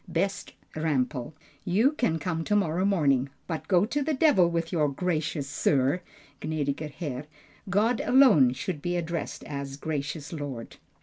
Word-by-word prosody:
_ - - -10
BEST 195 +3 -1 0.2
RAMPEL, 145 -3 -1 0.3
You 215 +10 +3
can 240 - 0
come 165 +1 -2
to 210 - +1
morrow 185 -2 +1
morning, 140 -9 +2 0.2
but 160 -3 -5
go 185 0 +4
to 290 +6 -1
the 300 +1 0
devil 255 - +4
with 165 -1 -2
your 155 -5 +2
"Gracious 155 -2 -2
Sir," 140 +2 +1 0.4
(Gnädiger 150 -1 -2
Herr). 145 -3 -5 0.4
God 220 +5 +2
alone 220 - +6
should 150 +2 -4
be 175 +2 -1
addressed 170 0 -4
as 140 -1 -5
"Gracious 150 +1 -4
Lord." 140 -7 -6
160 Hz, 150 wpm, -27 LUFS, 145-185 Hz, 0.4 s, alone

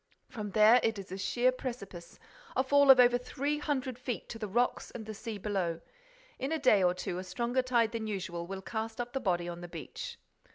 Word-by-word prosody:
From 210 -2 -6
there 220 +3 +7
it 225 -1 0
is 195 -2 -8
a 190 - -4
sheer 245 +6 +2
precipice, 235 -9 -7 0.4
a 260 - +3
fall 285 +1 +4
of 265 -1 +10
over 245 0 +6
three 285 +4 -2
hundred 265 -4 -2
feet 250 -2 -4
to 225 - -7
the 215 - -3
rocks 240 +5 0
and 225 -3 -8
the 215 - -6
sea 220 +1 -6
below. 185 -5 -2 0.6
In 270 +3 -2
a 320 - +1
day 255 -9 +4
or 180 -1 +3
two, 180 0 -4
a - - -5
stronger 235 +7 -1
tide 240 -3 +2
than 225 -2 -3
usual 180 -4 -4
will 190 0 -6
cast 220 +2 -4
up 240 0 -4
the 270 - 0
body 175 -6 0
on 175 0 -6
the 175 - -7
beach." 475 - -7
225 Hz, 220 wpm, -31 LUFS, 190-255 Hz, 0.6 s, of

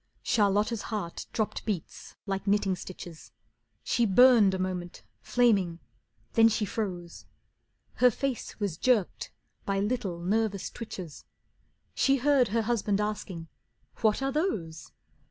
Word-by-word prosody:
Charlotta's 210 0 +2
heart 205 -6 -5
dropped 220 -2 -2
beats 200 -7 -5
like 195 0 -3
knitting 200 -2 +2
stitches. 175 -2 -10 0.5
She 235 -1 +1
burned 220 -2 +6
a - - -2
moment, 185 -1 -4 0.2
flaming; 200 -9 +2 0.6
then 225 -1 +6
she 215 -1 0
froze. 180 -5 -5 0.7
Her 250 - +6
face 260 0 -4
was 200 -6 -2
jerked 235 -8 +1 0.3
by 195 -1 -1
little, 205 -4 -1
nervous 200 +2 -1
twitches, 185 -9 -8 0.7
She 275 0 +3
heard 275 -1 +3
her 225 +3 0
husband 210 -3 0
asking: 205 -5 -4 0.5
"What 220 +4 +1
are 270 - 0
those?" 210 - -2
210 Hz, 120 wpm, -28 LUFS, 185-235 Hz, 0.7 s, burned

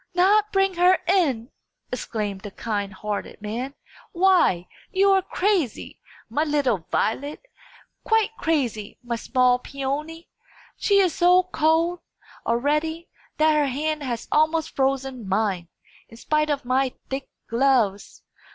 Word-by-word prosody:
"Not 415 +4 +4
bring 390 -1 +2
her 360 +1 +5
in!" 290 - +1 0.4
exclaimed 210 -5 -4
the 205 - -7
kind 205 -1 -3
hearted 205 +1 -5
man. 235 +6 -5 0.4
"Why, 345 - +3 0.2
you 390 +1 +4
are 385 0 +4
crazy, 370 - -1 0.3
my 300 - 0
little 270 - 0
Violet! 285 - -1 0.6
quite 445 -1 +2
crazy, 250 - -1
my 240 -1 -2
small 250 +1 +2
Peony! 285 +6 -5 0.5
She 400 - +2
is 375 -4 +3
so 360 +1 +5
cold, 335 0 +1 0.5
already, 300 +7 0 0.3
that 310 0 +4
her 300 -2 +2
hand 305 +3 -2
has 240 -4 -4
almost 315 +1 +1
frozen 265 -5 -1
mine, 190 -3 0 0.4
in 230 - -14
spite 305 +4 0
of 285 -3 -1
my 255 +1 +1 0.2
thick 270 0 -4 0.2
gloves. 230 -5 +1
280 Hz, 125 wpm, -24 LUFS, 235-335 Hz, 0.6 s, her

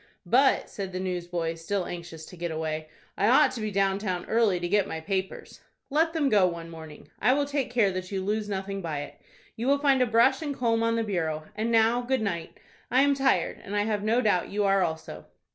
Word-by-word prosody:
"But," 260 +9 +3
said 195 -2 -6
the 185 - -3
newsboy, 175 -2 -2
still 180 +3 -3
anxious 170 -2 -8
to - - -12
get 170 0 -4
away, 155 -1 -4 0.3
"I 205 - +1
ought 265 +3 +5
to 245 -3 -6
be 215 - -2
down 195 -1 +1
town 185 -4 -3
early 220 -5 +2
to 175 - -2
get 200 +2 +2
my 160 - -4
papers." 190 +2 -4 0.3
"Let 325 +3 +2
them 310 -4 +1
go 205 -7 +4
one 170 -1 -6
morning. 160 -2 -11
I 255 - +4
will 285 +1 +1
take 280 -2 -2
care 230 -5 +2
that 185 0 -5
you 190 -1 -2
lose 210 +1 -1
nothing 195 0 -3
by 155 -4 -3
it. 145 - -10 0.3
You 235 +3 -3
will 280 +1 +4
find 275 -2 +3
a 250 - +3
brush 235 +5 +3
and 290 -3 -3
comb 230 -2 +1
on 230 0 +1
the 230 - 0
bureau. 160 -7 -2
And 225 +2 -1
now, 230 +2 +3
good 245 -1 -1
night. 170 -5 -4 0.3
I 260 +2 +4
am 285 0 +4
tired, 270 -1 +1
and 205 0 -5
I 205 - +2
have 210 -1 -1
no 225 +4 +2
doubt 205 -6 +1
you 205 +1 -1
are 195 -1 +3
also." 160 -2 -4
200 Hz, 230 wpm, -27 LUFS, 175-240 Hz, 0.3 s, ought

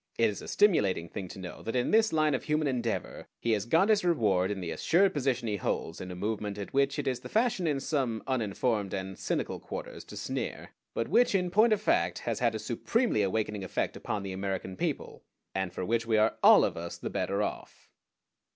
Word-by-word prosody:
It 115 -2 +3
is 100 - -7
a - - -9
stimulating 105 - +2
thing 95 -3 -5
to 90 - -10
know 95 -2 -8
that 115 - -4
in 125 - +1
this 220 0 +4
line 155 -2 +2
of 130 - -2
human 155 0 +1
endeavor 120 -4 -2
he 115 - 0
has 105 0 0
got 165 - +4
his 210 -3 +4
reward 105 - +2
in 105 -1 -3
the 85 -3 -4
assured 190 +3 +3
position 130 -4 0
he 105 -1 -1
holds 80 -3 -3
in 90 - -6
a 90 - -6
movement 105 +1 -3
at 100 - -6
which 140 0 +2
it - - -2
is 130 -2 0
the - - -10
fashion 220 -6 +1
in 145 -3 +1
some 130 -6 -1
uninformed 110 -4 -1
and 95 0 -5
cynical - - -2
quarters - - -7
to - - -10
sneer, - - -4 0.2
but 115 - -1
which 230 +3 +3
in 180 -2 +1
point 215 +5 +5
of 215 - +3
fact - - +2
has - - -3
had - - +1
a - - 0
supremely 230 - 0
awakening 105 0 -1
effect 95 - -2
upon 105 -2 -3
the 95 -1 -4
American 95 -1 -3
people, - - -3 0.3
and 95 -2 -2
for 90 - -4
which 115 +3 0
we 110 -1 +3
are 110 +1 +3
all - - +8
of - - -2
us 85 +1 -6
the - - -5
better - - 0
off. - - -6
115 Hz, 225 wpm, -29 LUFS, 100-155 Hz, 0.3 s, all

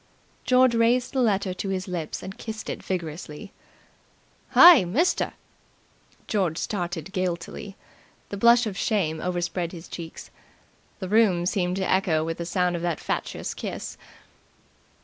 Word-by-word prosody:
George 255 -1 +5
raised 235 +2 +2
the 265 - +1
letter 200 -5 +1
to 195 +2 -4
his 190 0 -3
lips 170 -4 -4
and 190 +1 -8
kissed 220 -1 -5
it - - -6
vigorously. 170 +1 -5 1.0
"Hey, 345 - +10
mister!" 250 - +1 0.9
George 185 -7 0
started 175 -4 -3
guiltily. 185 +2 -4 0.5
The 200 - -5
blush 235 +3 +5
of 210 -3 -4
shame 170 -7 0
overspread 175 -1 -2
his 170 -1 -9
cheeks. 165 -2 -9 0.7
The 190 - -5
room 195 -4 +3
seemed 180 -1 0
to 190 -1 -1
echo 180 -5 +2
with 165 +1 -4
the 170 - -4
sound 180 -1 +1
of 170 - -4
that 170 -3 -1
fatuous - - -3
kiss. - - -6
185 Hz, 140 wpm, -25 LUFS, 175-215 Hz, 1.0 s, Hey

